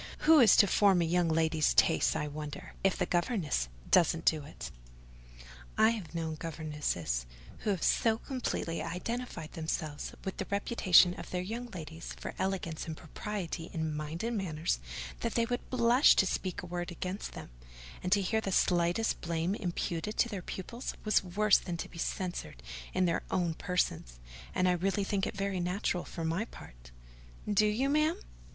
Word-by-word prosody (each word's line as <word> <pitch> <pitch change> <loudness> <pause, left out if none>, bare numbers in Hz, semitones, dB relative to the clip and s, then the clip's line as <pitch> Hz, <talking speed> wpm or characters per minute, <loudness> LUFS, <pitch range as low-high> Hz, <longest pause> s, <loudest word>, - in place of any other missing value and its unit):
Who 320 0 +7
is 230 -7 +8
to 205 - +7
form 195 -2 +4
a - - +1
young 175 +1 +2
lady's 160 -1 +2
tastes, 160 - +4
I 150 -1 -1
wonder, 150 0 -7
if 195 -1 +3
the - - +1
governess 175 - 0 0.2
doesn't 165 -2 +4
do 155 -2 +3
it? 145 - -8 1.1
I 220 - +6
have 180 -9 -6
known 160 -1 -2
governesses 150 - -2 0.3
who - - -2
have 190 -5 0
so 225 -1 +3
completely 235 -10 -3
identified 180 -1 -4
themselves 160 -2 -3
with 190 - -4
the 195 - -3
reputation 195 -3 +5
of - - -8
their 180 0 -2
young 230 +6 -4
ladies 165 -5 -8
for - - -5
elegance 185 -5 -2
and 160 -1 -5
propriety 175 -1 -5
in 160 -2 -2
mind 155 +4 -4
and 235 +1 -1
manners, 165 - -1 0.4
that - - -2
they 235 - +3
would 245 +1 -3
blush 245 +2 +5
to - - +4
speak 185 -1 -2
a - - -5
word 175 0 -4
against 180 +3 -5
them; - - -9 0.5
and 180 - -3
to 200 0 +4
hear 220 +4 +1
the 195 - -3
slightest 175 +4 +2
blame 170 +2 -1
imputed 180 0 -3
to 235 - +3
their 200 -5 -4
pupils 230 +8 -6
was 215 -3 +3
worse 200 +3 +4
than 175 -2 -4
to - - -4
be 170 - -11
censured 175 - -4 0.3
in 185 - +2
their 170 - +1
own 175 -3 +1
persons—and - - -2
I - - +5
really 190 +3 +1
think 195 0 0
it - - -6
very 195 -1 -1
natural, 180 0 -1
for 165 - -5
my 165 +7 0
part." - - -13 0.6
"Do 210 +1 +4
you, 225 +6 +1
ma'am?" 305 +5 +2
180 Hz, 175 wpm, -31 LUFS, 160-205 Hz, 1.1 s, is